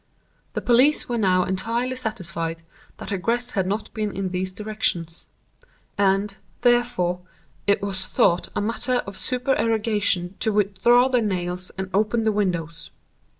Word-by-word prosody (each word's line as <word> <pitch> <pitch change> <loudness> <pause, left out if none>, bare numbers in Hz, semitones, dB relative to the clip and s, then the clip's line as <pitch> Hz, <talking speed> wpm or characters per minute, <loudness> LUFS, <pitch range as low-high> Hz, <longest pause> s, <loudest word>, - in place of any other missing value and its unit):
The - - -3
police 255 +5 +4
were 240 -2 -1
now 185 -3 +3
entirely 230 +8 -1
satisfied 170 -8 -3 0.3
that - - -7
egress 235 +6 -1
had 190 -3 0
not 210 +3 -3
been 215 -2 -2
in 195 -1 -3
these 185 +1 -2
directions. 185 -5 -2 0.7
And, 200 0 +2 0.3
therefore, 240 -8 +2 0.5
it 200 0 +3
was 190 -2 -3
thought 175 +1 +2
a - - 0
matter 240 +4 0
of 200 - -8
supererogation 220 -7 0
to 220 - +1
withdraw 210 +5 +4
the 250 -2 +2
nails 180 -3 -1
and 190 0 -3
open 215 +3 +2
the 220 - +3
windows. 170 -5 -2
205 Hz, 140 wpm, -24 LUFS, 185-230 Hz, 0.7 s, police